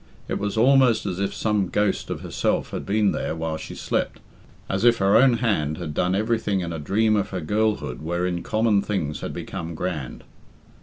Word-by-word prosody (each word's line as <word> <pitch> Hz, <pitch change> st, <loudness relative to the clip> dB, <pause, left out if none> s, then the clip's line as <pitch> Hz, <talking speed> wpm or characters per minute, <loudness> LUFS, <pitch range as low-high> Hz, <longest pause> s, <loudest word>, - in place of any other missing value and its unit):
It -, -, -2 dB
was 105 Hz, +2 st, -2 dB
almost 125 Hz, -2 st, +4 dB
as 95 Hz, -2 st, -3 dB
if 100 Hz, -, 0 dB
some 105 Hz, -3 st, 0 dB
ghost 105 Hz, -1 st, 0 dB
of -, -, -4 dB
herself -, -, -1 dB
had -, -, -5 dB
been 105 Hz, 0 st, +2 dB
there -, -, -2 dB
while 80 Hz, -1 st, -3 dB
she -, -, -8 dB
slept -, -, -2 dB, 0.5 s
as 95 Hz, +3 st, -1 dB
if 120 Hz, -1 st, +5 dB
her 95 Hz, +1 st, +3 dB
own 125 Hz, +2 st, +6 dB
hand 90 Hz, -11 st, 0 dB
had 80 Hz, -3 st, -5 dB
done 90 Hz, +4 st, +1 dB
everything 110 Hz, -2 st, 0 dB
in 85 Hz, -1 st, -4 dB
a 80 Hz, -, -4 dB
dream 110 Hz, +8 st, +2 dB
of 100 Hz, -, 0 dB
her 95 Hz, -, -3 dB
girlhood 105 Hz, -, -1 dB
wherein 85 Hz, +2 st, -1 dB
common 110 Hz, -3 st, +2 dB
things 90 Hz, -8 st, -2 dB
had -, -, -4 dB
become 85 Hz, 0 st, -6 dB
grand. 80 Hz, -7 st, -4 dB
100 Hz, 195 wpm, -24 LUFS, 85-110 Hz, 0.5 s, own